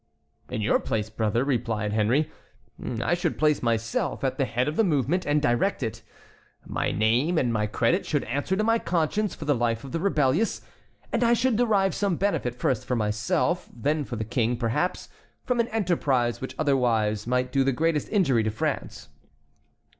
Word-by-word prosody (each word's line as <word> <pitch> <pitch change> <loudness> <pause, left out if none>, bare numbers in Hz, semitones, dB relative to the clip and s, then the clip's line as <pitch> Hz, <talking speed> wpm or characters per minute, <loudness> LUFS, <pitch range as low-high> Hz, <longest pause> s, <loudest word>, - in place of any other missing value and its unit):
"In 110 - -3
your 105 - +2
place, 110 -1 -2
brother," 110 +2 0
replied 115 -6 -1
Henry, 115 +8 +1 0.7
"I - - +1
should 175 -2 -1
place 150 -1 +2
myself 115 +1 -1
at 135 +2 -1
the 135 - +3
head 125 +2 -1
of 150 - -2
the 225 - +3
movement 160 - +1
and 145 +1 +3
direct 145 +5 +1
it. 110 - -4 0.6
My - - -1
name 120 - +2
and 120 -6 +1
my 105 -1 0
credit 175 - +1
should 145 -4 -1
answer 145 +9 -1
to 215 - 0
my 230 +1 +3
conscience 180 +5 0
for - - -8
the 145 - +3
life 115 -2 -1
of 135 - -8
the 165 - -2
rebellious, 160 +1 +1 0.5
and 235 - +1
I 235 0 +4
should 240 0 +2
derive 210 -5 +2
some 200 -3 0
benefit 165 -11 -1
first 125 -1 0
for 125 - -1
myself, 115 +11 0
then 145 +5 -1
for 125 - -6
the 110 - -3
King, 120 +1 0
perhaps, 125 +10 -1 0.4
from 250 -1 0
an 235 - +2
enterprise 155 - 0
which 130 - -6
otherwise 115 -7 +1
might 125 +1 0
do 135 0 +2
the 135 - +2
greatest 155 +2 0
injury 150 - +3
to 110 - 0
France." 110 - -3
135 Hz, 185 wpm, -26 LUFS, 115-175 Hz, 0.7 s, I